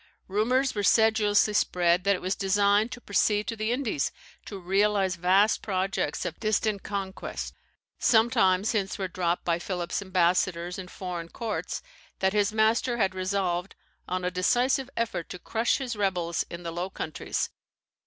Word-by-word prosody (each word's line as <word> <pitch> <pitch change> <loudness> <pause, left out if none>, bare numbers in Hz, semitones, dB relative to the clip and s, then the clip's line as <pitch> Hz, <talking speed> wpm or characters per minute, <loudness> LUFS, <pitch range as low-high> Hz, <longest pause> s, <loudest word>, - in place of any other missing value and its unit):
Rumours 250 +7 +1
were 205 - -1
sedulously 215 0 +4
spread 180 -2 +2
that 200 0 +4
it 180 - -8
was 185 +1 0
designed 205 +3 +2
to 245 - -6
proceed 210 -1 +1
to 230 - -3
the 215 +1 -1
Indies 245 - -1 0.3
to 200 - -7
realize 195 +1 +1
vast 190 +5 +3
projects 195 -1 -1
of - - -5
distant 215 -2 0
conquest. 195 -1 -5 0.5
Sometimes 220 -4 +3
hints 200 -4 -1
were 190 -2 -2
dropped 175 -1 -1
by 170 -1 +1
Philip's 175 +1 -3
ambassadors 180 -1 +1
in 185 - -7
foreign 175 -2 -6
courts, 225 +2 -4 0.3
that 190 0 +1
his 205 -1 +2
master 220 +3 +2
had 195 -4 +1
resolved 185 -1 -1 0.3
on 185 0 -2
a 180 - 0
decisive 245 +8 +1
effort 230 -7 -2
to - - -6
crush 225 +5 0
his 255 -4 -4
rebels 180 -5 0
in 170 +1 -8
the 170 - -4
Low 175 +3 -3
Countries. 155 -4 -3
195 Hz, 155 wpm, -27 LUFS, 180-220 Hz, 0.5 s, sedulously